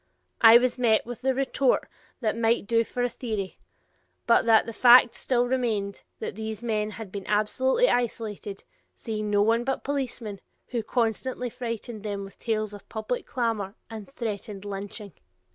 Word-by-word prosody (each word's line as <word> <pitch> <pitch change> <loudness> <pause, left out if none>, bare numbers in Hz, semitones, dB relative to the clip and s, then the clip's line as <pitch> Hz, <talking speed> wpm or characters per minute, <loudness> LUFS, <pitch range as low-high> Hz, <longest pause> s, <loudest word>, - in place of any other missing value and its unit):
I 225 0 +10
was 250 +1 0
met 225 -3 +3
with 245 0 -7
the 265 0 +1
retort 270 -1 +2 0.4
that 220 -3 +1
that 230 - -6
might 225 -1 +2
do 230 +2 +3
for 245 +2 -3
a - - +3
theory, 215 -6 -5 0.7
but 235 - +4
that 225 -1 +5
the 230 - -6
fact 240 +1 +7
still 245 -2 +1
remained 225 -6 -1 0.2
that - - -5
these 220 +1 -5
men 215 -2 0
had 215 -2 -8
been 200 -1 -6
absolutely 260 - +2
isolated, 220 - -2 0.3
seeing 215 -2 -4
no 205 0 +3
one 230 +2 +2
but 270 +1 -2
policemen, 245 -7 -3 0.3
who 240 -2 -1
constantly 240 +2 -1
frightened 230 -2 -5
them 200 -1 -4
with 195 - -12
tales 215 -2 -1
of 205 - -12
public 220 +2 -3
clamor 225 -5 -2 0.2
and 220 0 -8
threatened 210 -5 -5
lynching. 200 0 -6
225 Hz, 165 wpm, -26 LUFS, 210-245 Hz, 0.7 s, I